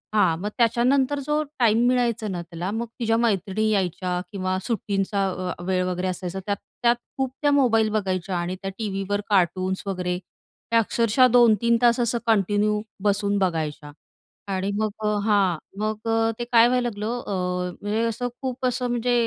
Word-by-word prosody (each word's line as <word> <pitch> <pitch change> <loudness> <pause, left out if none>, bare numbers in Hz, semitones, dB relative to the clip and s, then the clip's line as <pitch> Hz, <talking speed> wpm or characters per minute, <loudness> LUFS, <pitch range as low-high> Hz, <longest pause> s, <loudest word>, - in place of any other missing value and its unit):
हां. 180 -6 +3
मग 210 - -2
त्याच्यानंतर 255 +4 +2
जो 300 +1 +1 0.2
टाईम 235 0 +4
मिळायचा 240 -3 +1
ना, 180 -4 -3
त्याला 170 +2 -5
मग 230 +2 -2
तिच्या 225 -1 +1
मैत्रिणी 215 -1 +1
यायच्या 180 -3 0
किंवा 185 -2 -2
सुट्टींचा 195 -4 -1
वेळ 185 -1 +1
वगैरे 180 0 -2
असायचा 185 0 -4
त्यात 205 -1 -1 0.3
त्यात 235 0 +5 0.2
खूप 265 -1 -1
त्या 290 -1 +3
मोबाईल 230 -6 +3
बघायच्या 190 -3 -1
आणि 175 +1 -2
त्या 195 - -3
टीव्हीवर 205 -1 -2
कार्टून्स 185 -1 +1
वगैरे 180 -2 -2
त्या 230 +4 -4
अक्षरशः 230 +3 +3
2-3 235 -1 +5
तास 240 0 +4
असं 235 0 +1
कंटिन्यू 210 0 +2 0.2
बसून 205 0 +1
बघायच्या. 160 -5 -2 0.6
आणि 190 +1 -1
मग 215 0 +1 0.2
अ, - - +2 0.2
हां 200 -5 +3 0.2
मग 215 +1 -3
अ, 225 0 +2
ते - - -1
काय 235 -1 +5
व्हायला 250 0 +1
लागलं 220 +3 -3
अ, - - -3 0.5
म्हणजे 210 +2 -1
असं 230 +2 -2
खूप 260 -1 -3
असं 250 0 0
म्हणजे 240 0 0
210 Hz, 160 wpm, -24 LUFS, 190-235 Hz, 0.6 s, त्यात